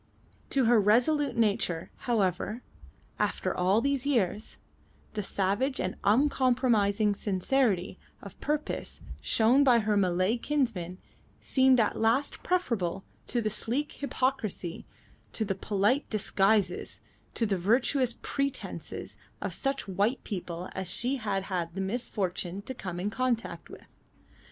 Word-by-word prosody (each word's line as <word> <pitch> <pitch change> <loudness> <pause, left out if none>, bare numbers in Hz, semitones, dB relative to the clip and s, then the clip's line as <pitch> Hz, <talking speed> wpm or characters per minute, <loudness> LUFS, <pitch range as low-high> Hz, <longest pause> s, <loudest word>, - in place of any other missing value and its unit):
To 270 -3 +2
her 230 -1 +5
resolute 250 +8 +3
nature, 200 -7 0
however, 215 0 -1 0.6
after - - 0
all 190 +5 +3
these 275 -1 0
years, 215 -7 0 0.6
the 215 - -2
savage 205 +8 0
and 185 - -2
uncompromising 230 -3 +3
sincerity 200 0 0 0.2
of - - -12
purpose 300 0 -2 0.2
shown 240 +5 +4
by 250 -4 +6
her 215 -2 +1
Malay 185 +3 +2
kinsmen 230 - -1 0.4
seemed 260 -1 +4
at 215 - +1
last 230 +6 +1
preferable 210 - -1 0.2
to 240 - 0
the 215 -1 -1
sleek 255 +8 -2
hypocrisy, 255 -10 -2 0.5
to 220 - -1
the 195 - 0
polite 205 +7 +1
disguises, 200 -2 +1 0.3
to 230 - +1
the 195 -3 0
virtuous 240 +5 +2
pretences 275 -1 -3 0.2
of - - -3
such 275 -3 -1
white 205 +7 0
people 180 -3 -5
as 190 -1 -4
she 250 +8 +1
had 205 -5 -2
had 175 -3 -3
the - - -4
misfortune 195 -3 -2
to 260 - -5
come 180 -7 -6
in 200 +3 -2
contact 245 -1 -2
with. - - -12
220 Hz, 125 wpm, -29 LUFS, 195-255 Hz, 0.6 s, by